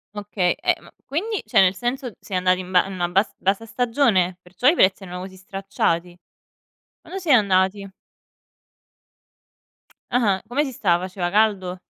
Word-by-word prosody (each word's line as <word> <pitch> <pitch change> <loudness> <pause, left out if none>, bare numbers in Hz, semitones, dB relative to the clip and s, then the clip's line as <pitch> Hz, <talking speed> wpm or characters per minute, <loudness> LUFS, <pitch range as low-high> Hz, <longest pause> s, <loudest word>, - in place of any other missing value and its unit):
Okay, 200 -3 0
eh - - +2
ma - - -17
quindi 405 +9 -2
cioè 215 - +4
nel 185 -1 +4
senso 245 +5 -3
siete 195 - -7
andati 185 0 +2
in 185 -1 -7
ba 180 -1 +4
in 195 - -7
una 175 -2 -2
bas 195 +4 +1
bassa 195 +4 -1
stagione? 225 -7 +1
Perciò 185 +8 -2
i 315 - +6
prezzi 190 - +3
erano 180 -1 -7
così 190 0 -9
stracciati? 185 -2 -2 0.9
Quando 385 - -7
siete 310 -8 +5
andati? 195 0 +1 2.2
Ah-ah. 210 -6 +2
Come 265 +6 0
si 270 - -5
stava? 180 -6 0
Faceva 185 -2 -3
caldo? 195 -3 +1
195 Hz, 155 wpm, -22 LUFS, 185-230 Hz, 2.2 s, i